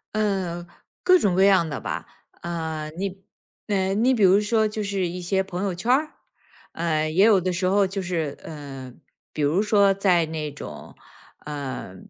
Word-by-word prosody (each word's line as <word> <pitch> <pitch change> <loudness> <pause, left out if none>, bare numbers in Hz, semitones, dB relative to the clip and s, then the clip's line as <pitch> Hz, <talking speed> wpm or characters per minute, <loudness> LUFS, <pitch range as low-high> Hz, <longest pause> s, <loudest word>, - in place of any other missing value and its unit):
呃， 190 -5 -1 0.4
各 365 0 +6
种 195 - +1
各 190 - +4
样 190 -4 +5
的 145 - -4
吧， - - -4 0.4
呃， 160 -3 -4
你 195 0 -4 0.4
呃， 195 -2 0
你 240 +6 +3
比 225 -5 +1
如 195 +2 +6
说 220 +1 +2
就 215 0 -4
是 195 -2 -1
一 180 +1 -5
些 190 +2 +1
朋 190 -1 -4
友 195 -2 -1
圈 185 +7 -5
儿， 305 +4 +2 0.6
呃， 155 -2 0
也 180 +5 +3
有 215 -3 +6
的 180 0 -1
时 185 +1 -1
候 195 +1 +3
就 195 +1 -4
是， 165 -5 -3
呃， 135 -5 -8 0.4
比 - - -4
如 150 +7 +2
说 200 -2 +4
在 185 -4 +2
那 155 -1 -4
种， 140 - -10 0.5
呃， 140 -10 -6
185 Hz, 190 characters per minute, -24 LUFS, 160-200 Hz, 0.6 s, 各